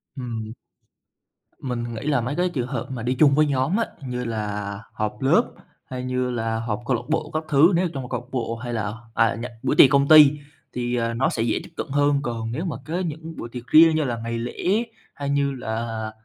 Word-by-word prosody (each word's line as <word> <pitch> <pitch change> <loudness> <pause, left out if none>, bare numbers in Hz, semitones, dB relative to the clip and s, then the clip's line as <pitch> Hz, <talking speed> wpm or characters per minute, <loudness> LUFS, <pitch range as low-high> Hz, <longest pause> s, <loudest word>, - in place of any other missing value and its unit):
Ừm. 115 -4 -5 1.1
Mình 120 -2 -3
nghĩ 110 - -6
là 140 -5 +2
mấy 130 +5 -3
cái 180 0 +1
trường 125 -7 -3
hợp 130 -2 -4
mà 120 -3 -5
đi 125 +2 +1
chung 140 -3 +6
với 155 0 +4
nhóm 140 - +1
á, 230 - +1 0.2
như 125 0 -3
là 105 -2 -3
họp 105 +1 -3
lớp 135 - +4 0.4
hay 130 -1 -6
như 125 0 -1
là 115 -1 -1
họp 115 -1 -3
câu 125 - +1
lạc - - -4
bộ 160 - -1
các 155 0 -1
thứ, 155 +6 +6
nếu 180 +2 +2
ở - - -1
trong 130 -2 -5
câu 120 -1 -4
bộ 115 -3 -2
hay 120 +1 -6
là, 105 -2 -2 0.2
à, 115 0 +2
nh 115 - -6 0.2
buổi - - +1
tiệc 135 - +8
công 140 0 +3
ty 150 -3 +9 0.4
thì, 120 0 -2
à, 115 -1 0
nó 130 +3 +1
sẽ 115 - -2
dễ 120 - 0
tiếp - - -12
cận - - -3
hơn. 145 0 +2
Còn 115 -2 -3
nếu 160 +9 -3
mà 155 -8 -3
có 170 +3 -2
những 160 -1 -5
buổi 120 - -6
tiệc 125 +1 -8
riêng 160 +2 +7
như 155 - +2
là 120 -4 -2
ngày 115 0 -3
lễ 180 - 0 0.3
hay 140 -1 -4
như 140 0 +1
là, 110 -2 -4
125 Hz, 235 wpm, -23 LUFS, 115-145 Hz, 1.1 s, ty